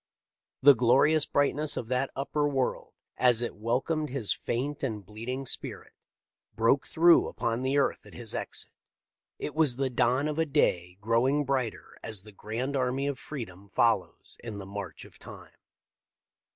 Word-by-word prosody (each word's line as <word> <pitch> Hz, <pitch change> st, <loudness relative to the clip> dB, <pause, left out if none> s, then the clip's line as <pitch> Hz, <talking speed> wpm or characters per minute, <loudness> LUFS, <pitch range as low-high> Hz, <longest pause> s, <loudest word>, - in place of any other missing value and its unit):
The 145 Hz, +1 st, +10 dB
glorious 135 Hz, +6 st, +4 dB
brightness 145 Hz, +1 st, +1 dB
of 115 Hz, -, -4 dB
that 130 Hz, +1 st, 0 dB
upper, 145 Hz, +2 st, 0 dB
world, 135 Hz, -3 st, -2 dB, 0.2 s
as 120 Hz, -2 st, +4 dB
it 120 Hz, -, -3 dB
welcomed 130 Hz, +8 st, -1 dB
his 125 Hz, -5 st, 0 dB
faint 140 Hz, +5 st, -3 dB
and 110 Hz, -7 st, -3 dB
bleeding 115 Hz, +7 st, -5 dB
spirit, -, -, -3 dB, 0.6 s
broke 115 Hz, +5 st, +2 dB
through 170 Hz, +1 st, +5 dB
upon 115 Hz, +1 st, -2 dB
the 135 Hz, +2 st, 0 dB
earth 140 Hz, -, 0 dB
at -, -, -13 dB
his 120 Hz, -3 st, -4 dB
exit -, -, -4 dB, 0.3 s
— -, -, -64 dB
it 150 Hz, -, -5 dB
was 155 Hz, -5 st, +3 dB
the 135 Hz, 0 st, -1 dB
dawn 125 Hz, +4 st, +2 dB
of 155 Hz, +1 st, -3 dB
a 160 Hz, -, +3 dB
day 90 Hz, -, +1 dB
growing 125 Hz, +7 st, +2 dB
brighter 130 Hz, -4 st, -3 dB
as 105 Hz, -3 st, 0 dB
the 105 Hz, -, -12 dB
grand 115 Hz, +7 st, -4 dB
army 130 Hz, +1 st, 0 dB
of 140 Hz, -2 st, -2 dB
freedom 100 Hz, -9 st, -8 dB
follows 110 Hz, -2 st, 0 dB
in 110 Hz, -3 st, -6 dB
the 100 Hz, -, -7 dB
march 100 Hz, -1 st, -7 dB
of -, -, -17 dB
time. -, -, -12 dB
125 Hz, 165 wpm, -28 LUFS, 115-140 Hz, 0.6 s, The